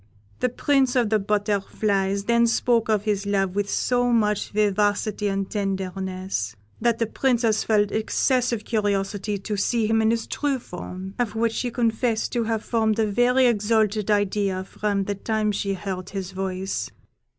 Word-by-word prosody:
The 250 - +1
Prince 265 0 +1
of 235 -4 +2
the 215 - +4
Butterflies 200 -1 0
then 235 +2 +3
spoke 230 -1 +2
of 210 -2 +2
his 205 -2 -1
love 195 -2 +1
with 205 0 0
so 245 -1 +1
much 210 -3 +1
vivacity 205 0 +1
and 195 -1 -1
tenderness, 190 - -3 0.3
that 235 0 +2
the 230 - +1
Princess 230 -2 +1
felt 210 -2 +2
excessive 235 +1 0
curiosity 205 -1 -1
to 205 +2 -4
see 225 +3 +1
him 225 +1 +2
in 220 - +3
his 230 0 0
true 285 -2 -1
form, 185 -3 -8
of 230 -3 -1
which 225 0 +1
she 245 - -1
confessed 230 -1 0
to 235 -2 0
have 225 -1 -2
formed 220 -2 +1
a 220 - +2
very 245 +5 +3
exalted 215 -2 +2
idea 200 -2 +1
from 200 +1 -2
the 205 - -2
time 215 +1 -1
she 200 -1 -2
heard 190 -1 -5
his 195 -2 -5
voice. 190 0 -3
210 Hz, 160 wpm, -24 LUFS, 195-230 Hz, 0.3 s, the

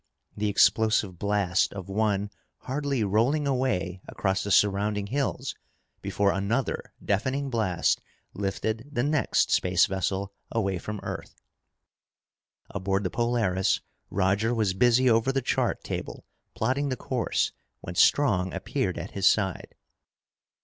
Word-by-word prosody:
The 105 0 0
explosive 100 -1 +3
blast 100 -3 +1
of 95 -2 -7
one 105 0 0 0.3
hardly 140 -2 -1
rolling 115 +9 +2
away 100 -10 -1
across 95 -1 -1
the 100 - -4
surrounding 105 +1 +2
hills 130 +2 -2 0.5
before 100 -1 +1
another 100 +7 -1
deafening 130 +7 0
blast 105 -7 +1 0.3
lifted 110 +5 -3
the 120 -4 0
next 150 0 +1
space 90 -1 +4
vessel 95 +1 -2 0.2
away 95 -5 0
from 105 +2 -6
Earth. - - -7 1.3
Aboard 95 0 -1
the 90 - -2
Polaris, 115 -6 +1 0.3
Roger 100 +5 +1
was 105 -4 +1
busy 120 +5 +4
over 115 +2 +3
the 135 - +1
chart - - 0
table - - -5 0.3
plotting 130 +5 0
the 130 - -2
course 125 -3 -1 0.3
when 85 - -6
Strong 95 -4 +3
appeared - - -2
at - - -6
his 100 -1 +4
side. 95 -4 -1
105 Hz, 125 wpm, -27 LUFS, 95-120 Hz, 1.3 s, space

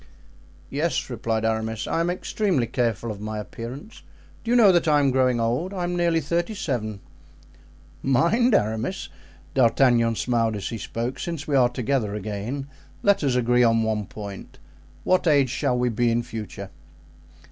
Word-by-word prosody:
"Yes," 145 -2 -1
replied 115 -1 -1
Aramis, 110 0 -1
"I - - -1
am 170 +1 +1
extremely 180 - 0
careful 115 -2 -1
of 105 -1 -8
my 110 0 -4
appearance. 125 - -8 0.4
Do 230 - -5
you 245 - +4
know 215 -5 +7
that 175 -2 +2
I 150 -1 +5
am 140 -2 +3
growing 130 -2 +2
old? 125 +12 -1
I 180 - -2
am 175 0 -1
nearly 170 -1 +2
thirty 170 +7 -1
seven." 110 - -3 1.0
"Mind, 185 - +3
Aramis"—D'Artagnan 115 +2 +1
smiled 115 -2 0
as 100 -2 -4
he 115 - -5
spoke—"since 135 +9 -4
we 145 - +1
are 125 -2 +5
together 120 -3 -1
again, 105 +7 -4 0.4
let 200 -5 +3
us 135 -3 +1
agree 125 0 +3
on 115 -1 +4
one 110 -2 -1
point: 100 -2 -9 0.5
what 185 -1 +2
age 140 -5 +4
shall 125 -1 0
we 125 0 +1
be 120 +1 +1
in 115 +1 +1
future?" 105 -4 -7
125 Hz, 160 wpm, -24 LUFS, 110-155 Hz, 1.0 s, know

